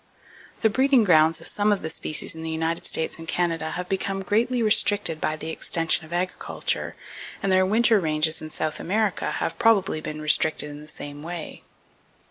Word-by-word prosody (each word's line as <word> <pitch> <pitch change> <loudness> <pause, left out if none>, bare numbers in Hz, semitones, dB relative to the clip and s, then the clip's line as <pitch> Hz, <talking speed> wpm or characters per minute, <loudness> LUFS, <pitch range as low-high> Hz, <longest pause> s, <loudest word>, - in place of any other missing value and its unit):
The 220 - +4
breeding 265 0 +3
grounds 160 -4 +4
of - - -7
some 210 +1 +3
of 205 - 0
the 160 - -3
species 155 +3 -2
in 160 - -9
the 160 - -5
United 160 +1 -2
States 160 +1 -1
and 165 - -9
Canada 165 -3 -1
have 180 0 -4
become 195 0 -2
greatly 235 +5 +1
restricted 205 -6 +3
by 155 - 0
the 160 +1 -6
extension 165 0 0
of - - -20
agriculture, 180 +1 -2 0.5
and 195 - +1
their 185 0 +4
winter 225 +1 +4
ranges 155 -1 +1
in 155 - -7
South 155 0 -2
America 210 +1 -1
have - - -3
probably 195 -8 +2
been 155 0 -6
restricted 155 0 +1
in 145 0 -10
the 150 - -13
same 145 -1 -8
way. 170 0 -7
170 Hz, 185 wpm, -24 LUFS, 155-205 Hz, 0.5 s, The